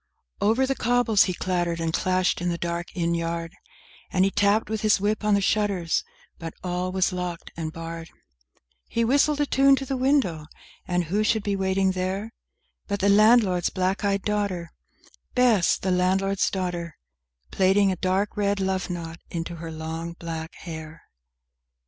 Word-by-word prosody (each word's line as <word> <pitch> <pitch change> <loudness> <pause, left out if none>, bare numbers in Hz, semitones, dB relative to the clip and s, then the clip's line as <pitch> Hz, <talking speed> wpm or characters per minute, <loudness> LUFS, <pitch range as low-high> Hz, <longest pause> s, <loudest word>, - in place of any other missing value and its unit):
III - - +3
Over 250 +4 +3
the 270 - 0
cobbles 245 -4 +3
he 185 - -1
clattered 175 -2 -1
and 165 -1 -1
clashed 185 0 +1
in 175 - 0
the 170 - -1
dark 170 0 -3
inn 170 -1 0
yard, 170 0 -3 0.6
And 185 0 +3
he 195 - +1
tapped 205 +2 +2
with 220 0 -3
his 215 -2 +3
whip 210 +2 0
on 210 -1 +3
the 200 - +2
shutters, 195 -4 +1 0.4
but 165 -1 -7
all 180 0 -2
was 190 0 +1
locked 180 -2 -5
and 160 -1 -4
barred; 165 0 -7 0.8
He 230 0 0
whistled 285 +4 +3
a 290 - +3
tune 275 0 +5
to 270 - -4
the 270 - -2
window, 255 - +1 0.4
and 180 -1 +1
who 195 +6 0
should 220 -1 +1
be 200 -1 0
waiting 190 0 +1
there 190 +4 -3 0.5
But 200 -1 -2
the 200 +1 +3
landlord's 205 -4 +5
black 185 +2 -1
eyed 200 -1 +1
daughter, 200 -5 -2 0.6
Bess, 240 -8 +4
the 190 - -2
landlord's 190 +2 +2
daughter, 175 -4 -4 0.5
Plaiting 195 +1 +3
a - - -1
dark 190 +3 0
red 200 -1 0
love 190 -1 -1
knot 170 -1 -5
into 170 0 -5
her 165 0 -7
long 160 +1 -5
black 165 -1 -6
hair. 160 -2 -9
185 Hz, 170 wpm, -25 LUFS, 170-205 Hz, 0.8 s, tune